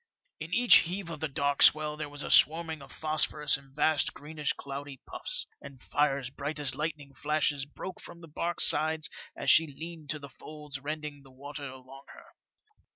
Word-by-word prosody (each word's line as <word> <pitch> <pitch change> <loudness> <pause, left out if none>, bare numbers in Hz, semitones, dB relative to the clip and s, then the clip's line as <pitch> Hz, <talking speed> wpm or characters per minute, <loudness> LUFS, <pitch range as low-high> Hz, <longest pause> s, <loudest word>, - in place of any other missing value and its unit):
In 160 - -7
each 245 +5 +7
heave 175 0 -2
of 160 - -7
the 160 - -1
dark 140 0 -1
swell 155 0 +6
there 150 -1 -6
was 145 0 -6
a - - -4
swarming 160 0 +4
of 140 - -13
phosphorus 155 -1 +2
in 135 -1 -11
vast 150 +2 +1
greenish 150 0 -3
cloudy 140 -1 -8
puffs, - - -4 0.2
and 140 -2 -12
fires 140 -2 -1
bright 145 +3 -4
as 140 -3 +1
lightning 150 -1 -5
flashes 145 -1 -1
broke 185 +5 -8
from 170 - -11
the 165 - -11
barque's 170 +3 0
sides 155 +1 +3 0.3
as - - +3
she 160 - +6
leaned 160 +1 -9
to 155 - 0
the 145 -1 -9
folds 150 0 -8
rending 150 0 -6
the 135 - -17
water 145 +2 -9
along 130 +1 -13
her. - - -14
150 Hz, 185 wpm, -29 LUFS, 140-155 Hz, 0.3 s, each